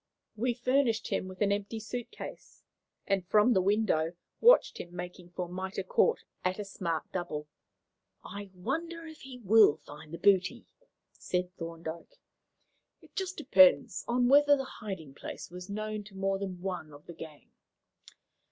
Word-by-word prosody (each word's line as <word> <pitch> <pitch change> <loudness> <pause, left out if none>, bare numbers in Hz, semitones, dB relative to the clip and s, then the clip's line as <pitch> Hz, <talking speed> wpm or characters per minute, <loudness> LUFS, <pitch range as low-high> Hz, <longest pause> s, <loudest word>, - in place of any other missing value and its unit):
We 240 +2 0
furnished 250 -2 +1
him - - -1
with 185 +1 -10
an 200 -1 +3
empty 205 +2 -2
suit 240 +2 -5
case, 430 - -10 0.4
and, 195 -2 +1
from 215 +5 +5
the 190 - +4
window, 185 -5 +2 0.3
watched - - +6
him 175 0 -8
making 180 0 -7
for 180 - -2
Mitre 190 +2 -4
Court 470 - +2 0.2
at 185 0 0
a 210 - -4
smart 170 -5 -2
double. 175 -5 -4 0.8
"I 200 0 -7
wonder 330 - -3
if 315 -1 -11
he 260 -1 -9
will 215 -7 +6
find 150 +1 -12
the 170 - -5
booty," 190 -2 +3 0.5
said 180 0 -3
Thorndyke. 165 - -7 0.8
"It - - -21
just 380 -1 -3
depends 280 -2 +5
on 245 +1 +2
whether 290 +2 +6
the 270 - -2 0.2
hiding 190 - -6
place - - -8
was 180 +2 -8
known 215 +1 -3
to 195 -1 -14
more 195 0 0
than 185 -3 -5
one 180 -5 -4
of 145 +1 -14
the 170 - -9
gang. 155 -3 -11
195 Hz, 160 wpm, -31 LUFS, 180-240 Hz, 0.8 s, watched